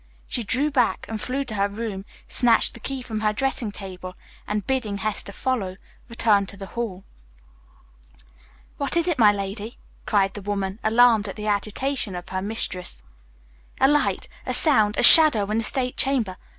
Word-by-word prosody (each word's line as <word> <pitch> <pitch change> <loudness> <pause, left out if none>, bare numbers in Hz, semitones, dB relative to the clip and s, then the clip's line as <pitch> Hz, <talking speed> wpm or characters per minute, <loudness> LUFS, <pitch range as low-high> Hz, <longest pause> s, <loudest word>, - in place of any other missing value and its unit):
She 240 - -2
drew 275 +8 +1
back 250 -5 0
and 220 -1 -6
flew 270 +2 -3
to 245 -5 -7
her 200 -1 0
room, 205 -2 -6 0.2
snatched 235 -3 +3
the - - -12
key 265 +2 -6
from 220 -3 -5
her 215 -1 0
dressing 235 -1 -2
table, 185 -2 -10 0.3
and, 210 -1 -3
bidding 245 -7 -2
Hester 205 0 -3
follow, 200 -4 -3 0.3
returned 210 -4 +1
to 200 - -8
the 195 - -8
hall. 220 -6 -5 1.7
"What 280 +3 -1
is 340 - +1
it, 340 -7 -1
my 210 -2 +6
lady?" 205 +3 -6 0.3
cried 195 -2 +1
the 205 - -8
woman, 200 0 -4
alarmed 225 -1 +3
at 195 - -7
the 210 - -7
agitation 215 +2 -2
of 175 +1 -8
her 185 0 -4
mistress. 185 - -3 0.8
"A 265 - +4
light, 295 +1 0 0.2
a - - 0
sound, 215 -9 +3
a - - +1
shadow 290 -7 +9
in 220 - 0
the - - -1
state 250 +2 0
chamber. 250 -8 +1
215 Hz, 175 wpm, -23 LUFS, 200-250 Hz, 1.7 s, shadow